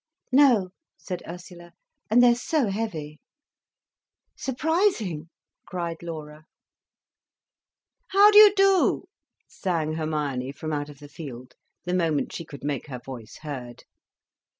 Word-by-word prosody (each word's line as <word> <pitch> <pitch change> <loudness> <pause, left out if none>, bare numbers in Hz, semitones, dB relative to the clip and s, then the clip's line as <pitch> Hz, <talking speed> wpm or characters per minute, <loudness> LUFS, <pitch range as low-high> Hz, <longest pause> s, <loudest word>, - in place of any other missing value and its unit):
"No," 255 -8 +5 0.3
said 180 -2 -6
Ursula. 175 0 -10 0.4
"And 240 +3 +5
they're 240 -1 +7
so 250 0 0
heavy." 160 -8 -4 1.2
"Surprising!" 270 - 0 0.4
cried 170 -3 -4
Laura. 155 -2 -8 1.6
"How 405 +2 +6
do 420 - +9
you 425 -1 +10
do," 390 -1 +3 0.4
sang 165 -4 -2
Hermione, 150 -5 -2
from 155 +2 -5
out 145 0 -3
of 145 - -12
the 145 +1 -12
field, 130 -5 -9 0.3
the 180 - -3
moment 165 -5 0
she 165 - -6
could 140 -3 -11
make 145 0 -3
her 130 -3 -6
voice 120 -3 -10
heard. 125 -5 -7
165 Hz, 120 wpm, -25 LUFS, 150-230 Hz, 1.6 s, you